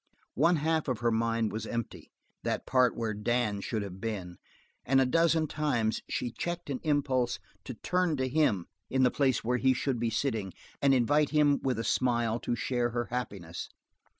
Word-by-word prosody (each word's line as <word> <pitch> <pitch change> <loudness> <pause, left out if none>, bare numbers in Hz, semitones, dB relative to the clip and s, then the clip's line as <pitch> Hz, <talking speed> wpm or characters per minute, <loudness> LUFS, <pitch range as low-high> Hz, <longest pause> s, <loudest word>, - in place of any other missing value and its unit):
One 165 +6 +4
half 160 +1 0
of 125 -4 -2
her 120 -1 +2
mind 115 0 +1
was 110 0 -4
empty, 115 -2 -5 0.3
that - - -2
part 125 -2 +3
where 115 -2 -1
Dan 105 -1 0
should 110 0 -2
have 95 -1 -8
been, 95 -6 -4 0.5
and 135 +2 +3
a 135 - +4
dozen 165 +3 +3
times 120 -8 0
she 120 - -2
checked 175 +2 -4
an 130 - -2
impulse 135 -5 +1 0.3
to 130 - -6
turn 180 +4 0
to 130 0 0
him 125 - +2 0.2
in 130 0 +2
the 125 - +4
place 135 -3 +1
where 125 +2 +1
he 130 +1 +3
should 130 -1 -1
be 115 0 0
sitting 110 -5 -1 0.3
and 140 -1 +5
invite 145 +4 +3
him 150 -2 +3
with 130 -2 0
a 115 - -2
smile 120 -2 +1
to 120 - -2
share 120 0 0
her 120 -2 -3
happiness. 100 -9 -4
125 Hz, 185 wpm, -30 LUFS, 115-140 Hz, 0.5 s, and